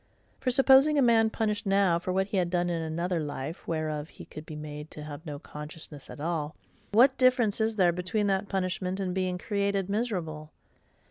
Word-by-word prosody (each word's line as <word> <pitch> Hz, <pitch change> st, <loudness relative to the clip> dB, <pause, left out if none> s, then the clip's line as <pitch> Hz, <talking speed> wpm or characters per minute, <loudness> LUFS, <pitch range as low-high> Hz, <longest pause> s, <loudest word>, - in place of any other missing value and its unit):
For, 260 Hz, -, 0 dB
supposing 270 Hz, +3 st, +6 dB
a -, -, +5 dB
MAN 225 Hz, -2 st, +4 dB
punished 210 Hz, -2 st, -2 dB
now 195 Hz, -3 st, +3 dB
for 185 Hz, +1 st, -3 dB
what 190 Hz, +1 st, +1 dB
he 200 Hz, 0 st, -3 dB
had 180 Hz, -2 st, +1 dB
done 175 Hz, 0 st, 0 dB
in 165 Hz, -1 st, -1 dB
another 170 Hz, +2 st, -1 dB
life, 150 Hz, +2 st, -5 dB
whereof 155 Hz, -2 st, -2 dB
he -, -, -12 dB
could 155 Hz, +1 st, -10 dB
be 155 Hz, -, -7 dB
made 150 Hz, 0 st, -7 dB
to 150 Hz, -, -9 dB
have 150 Hz, 0 st, -8 dB
no 145 Hz, -1 st, -5 dB
consciousness 150 Hz, 0 st, -10 dB
at -, -, -9 dB
all, 155 Hz, -1 st, -2 dB, 0.4 s
what 255 Hz, +5 st, +5 dB
difference 250 Hz, -5 st, +3 dB
is 220 Hz, 0 st, +1 dB
there 180 Hz, -4 st, +4 dB
between 180 Hz, +4 st, -1 dB
that 195 Hz, 0 st, 0 dB
punishment 185 Hz, 0 st, -2 dB
and 185 Hz, -2 st, -2 dB
being 185 Hz, -1 st, -1 dB
CREATED 200 Hz, -1 st, -1 dB
miserable? 170 Hz, -9 st, -3 dB
180 Hz, 195 wpm, -28 LUFS, 155-205 Hz, 0.4 s, supposing